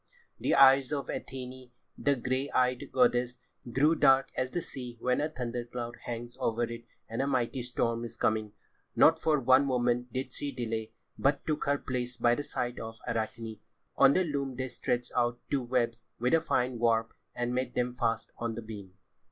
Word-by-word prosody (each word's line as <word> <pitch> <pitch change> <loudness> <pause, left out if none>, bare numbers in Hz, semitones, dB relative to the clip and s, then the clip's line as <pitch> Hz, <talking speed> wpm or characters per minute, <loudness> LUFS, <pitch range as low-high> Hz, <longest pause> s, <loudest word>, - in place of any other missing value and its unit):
The - - +2
eyes 135 0 +7
of 140 -2 -2
Athené, 130 -1 -6 0.3
the 140 -1 +2
grey 130 +2 -1
eyed 125 -1 +1
goddess, 125 -1 +2 0.3
grew 145 +6 +4
dark 135 -4 +4
as 130 0 -1
the 175 - -2
sea 125 -7 -7
when 125 +3 +1
a 150 - 0
thunder 125 -4 -4
cloud 120 0 -6
hangs 120 +1 -5
over 115 +1 0
it 115 0 -5 0.2
and 115 +3 -2
a 135 - 0
mighty 130 -1 0
storm 120 -1 -1
is 115 0 -7
coming. 110 -1 0 0.4
Not 160 0 +6
for 155 -2 +2
one 130 +1 +5
moment 125 -1 +1
did 130 -1 -4
she 145 - -3
delay, 110 -2 -3 0.3
but 140 +1 +2
took 155 -1 -1
her 140 0 +2
place 125 -2 -3
by 120 0 +4
the 135 - -1
side 120 -4 -3
of 115 0 -6
Arachne. 110 -1 -3 0.4
On 135 0 +6
the 185 - +3
loom 140 -5 -2
they 130 +1 -3
stretched 120 0 -2
out 120 -1 +2
two 140 -2 +2
webs 120 -2 0 0.2
with 125 +2 +1
a 165 - +5
fine 130 -6 0
warp, 115 -1 +2 0.2
and 120 0 -1
made 125 -1 -2
them 125 0 0
fast 115 -2 -1
on 115 -1 -2
the 115 - -6
beam. 100 -4 -9
125 Hz, 190 wpm, -30 LUFS, 120-135 Hz, 0.4 s, eyes